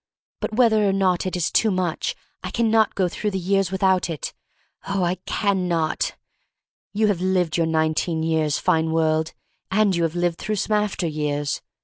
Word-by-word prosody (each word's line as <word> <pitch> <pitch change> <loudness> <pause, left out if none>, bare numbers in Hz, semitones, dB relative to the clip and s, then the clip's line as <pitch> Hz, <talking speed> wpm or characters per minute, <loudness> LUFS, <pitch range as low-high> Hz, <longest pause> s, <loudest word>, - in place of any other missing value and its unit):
But - - -3
whether 220 -4 +4
or - - +1
not 190 -2 +1
it 185 - -3
is 175 -1 0
too 220 - +3
much 185 - -1 0.3
I - - -4
can 230 -2 +1
not 220 -2 +3
go 185 -2 +2
through 210 +4 -2
the 195 - -3
years 190 0 +1
without 190 -2 +2
it 160 -3 -4 0.3
— - - -23
oh, 195 -1 0
I 175 0 +1
can 195 -3 0
not! 165 -3 -1 0.8
You 215 +1 +1
have 200 -4 +1
lived 180 -3 +1
your 165 -1 +2
nineteen 160 +1 0
years, 160 -2 +1
fine 160 -3 +1
world, 160 0 +1 0.4
and 200 -1 +2
you 170 - 0
have 165 0 0
lived 175 -1 0
through 215 - -2
some 210 +2 0
after 210 -3 0
years. 150 -2 -2
180 Hz, 195 wpm, -23 LUFS, 160-200 Hz, 0.8 s, whether